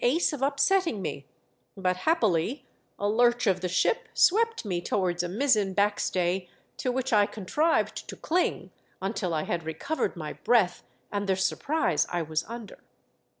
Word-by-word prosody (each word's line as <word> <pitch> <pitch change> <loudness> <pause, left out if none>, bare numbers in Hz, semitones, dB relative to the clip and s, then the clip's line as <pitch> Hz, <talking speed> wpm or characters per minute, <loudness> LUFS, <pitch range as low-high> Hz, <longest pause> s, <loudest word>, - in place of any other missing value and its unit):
ace 305 +7 +2
of 285 - -5
upsetting 280 - +2
me, 145 -6 -5 0.5
but, 185 -1 +1
happily, 220 - +1 0.3
a 205 - -1
lurch 240 +3 +3
of 190 -3 +2
the 180 - -1
ship 320 - +1
swept 455 - +3
me 180 -4 -1
towards 175 -2 0
a 175 - -3
mizzen 210 -3 +1
back 205 +1 +2
stay, 180 0 -1 0.3
to 255 - -1
which 260 0 -2
I 205 -1 +5
contrived 300 - 0
to - - -6
cling 355 +3 -1 0.3
until 195 -2 -2
I 155 -2 0
had 170 - -2
recovered 160 - -2
my 155 -3 -5
breath 220 -6 +2 0.3
and 205 -1 -2
the 190 - +3
surprise 190 - 0
I 175 -1 0
was 155 0 -2
under. 230 -1 -9
205 Hz, 160 wpm, -27 LUFS, 180-265 Hz, 0.5 s, I